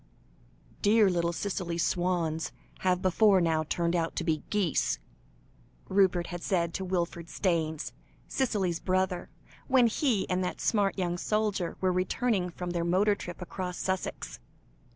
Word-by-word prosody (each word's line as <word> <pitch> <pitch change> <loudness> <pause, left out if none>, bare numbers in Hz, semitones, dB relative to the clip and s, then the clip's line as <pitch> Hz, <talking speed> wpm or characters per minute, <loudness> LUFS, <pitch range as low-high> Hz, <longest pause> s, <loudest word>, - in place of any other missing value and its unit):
"Dear 210 -1 +5
little 170 -1 +1
Cicely's 175 -2 -2
swans 175 -3 0 0.3
have 180 -1 +1
before 195 +1 +5
now 165 -2 +2
turned 170 +2 0
out 165 -1 -1
to - - -1
be 155 -3 0
geese," 195 -8 +1 0.9
Rupert 190 -3 +3
had 175 -1 -6
said 170 -4 0
to 190 - -3
Wilfred 175 -2 -2
Staynes, 160 -5 -1 0.4
Cicely's 195 -10 0
brother, 185 -1 0 0.4
when 260 -2 +5
he 230 -2 +1
and 185 0 0
that 180 - -3
smart 205 -3 +1
young 175 -2 -1
soldier 210 -5 -1
were 185 -1 +2
returning 185 +1 0
from 175 +1 -5
their 170 -1 -1
motor 190 +5 +3
trip 180 -2 -7
across 180 0 -5
Sussex. 185 - -3
180 Hz, 140 wpm, -29 LUFS, 170-195 Hz, 0.9 s, Dear